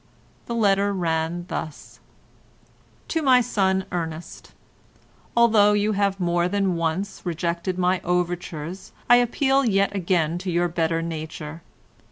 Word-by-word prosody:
The 235 - -3
letter 200 -2 +2
ran 170 -1 -1
thus:— 155 -4 -7 1.1
"To 325 - 0
my 260 -4 +5
son 190 -5 +1
Ernest,—Although 205 +6 -1
you 205 +1 +1
have 200 -1 0
more 175 -1 +1
than 195 -1 0
once 170 +4 -2
rejected 175 +1 -2
my 180 0 +1
overtures 175 -1 -3
I 245 - +7
appeal 270 +3 +2
yet 200 -4 +1
again 175 -3 0
to 185 +1 -5
your 175 0 +1
better 165 -1 0
nature. 160 -1 -6
180 Hz, 120 wpm, -23 LUFS, 170-200 Hz, 1.1 s, I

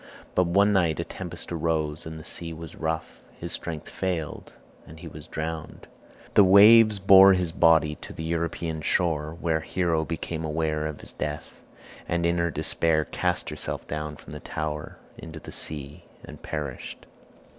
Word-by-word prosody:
But 90 - +3
one 100 +4 +4
night 85 -6 +2
a - - 0
tempest - - -8
arose 80 -2 -1
and 80 0 -7
the - - -10
sea 85 -1 -5
was 80 0 -9
rough; 80 0 -4 0.2
his - - -4
strength 80 -3 -5
failed, 90 -5 -4 0.4
and 80 +1 -12
he 85 - -9
was 75 0 -10
drowned. 80 0 -5 0.5
The 100 - +7
waves 105 +3 +8
bore 95 0 +8
his 90 -3 0
body 80 -2 +4
to - - -10
the 80 - -7
European 80 -1 -2
shore, 80 -1 0
where 80 -2 +1
Hero 85 -1 0
became 80 0 -4
aware 80 0 -1
of 75 -2 -7
his - - -9
death, 75 0 -5 0.5
and 85 0 0
in 85 0 +2
her 85 0 +1
despair 80 0 0
cast 90 -2 -2
herself 75 - -5
down 75 -1 -4
from 75 - -12
the 75 - -6
tower 75 0 -5 0.2
into 80 -1 -8
the - - -10
sea 75 -1 -4 0.2
and - - -12
perished. 75 -4 -6
80 Hz, 165 wpm, -26 LUFS, 75-85 Hz, 0.5 s, waves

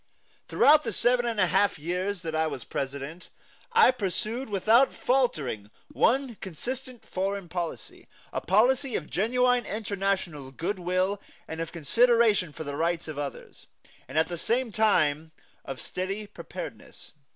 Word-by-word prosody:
Throughout 300 +1 +6
the 225 - -2
seven 245 +4 +2
and 230 -3 -2
a 185 - +5
half 195 +1 +2
years 180 +4 -2
that 160 -1 -4
I 160 0 +1
was 140 -5 -5
President, 140 +5 -5 0.4
I 460 - +6
pursued 225 +2 -3
without 220 +6 +4
faltering 150 - 0 0.2
one 260 -3 +1
consistent 250 - -6
foreign 195 0 -2
policy, 170 -1 -5 0.3
a - - -1
policy 250 - +3
of 155 - -4
genuine 245 +5 +2
international 195 -9 -2
good 170 +9 -3
will 185 +3 0 0.3
and 160 +1 -5
of 165 - -4
consideration 220 - +3
for 155 - -7
the 145 -1 -5
rights 165 +2 -1
of 155 -2 -5
others, 145 -1 -7 0.4
and 130 +4 -6
at 160 - +4
the 175 -2 -5
same 235 +3 0
time 160 -8 +2 0.3
of 135 -1 -6
steady 195 +3 -3
preparedness. - - -9
190 Hz, 145 wpm, -27 LUFS, 160-235 Hz, 0.4 s, Throughout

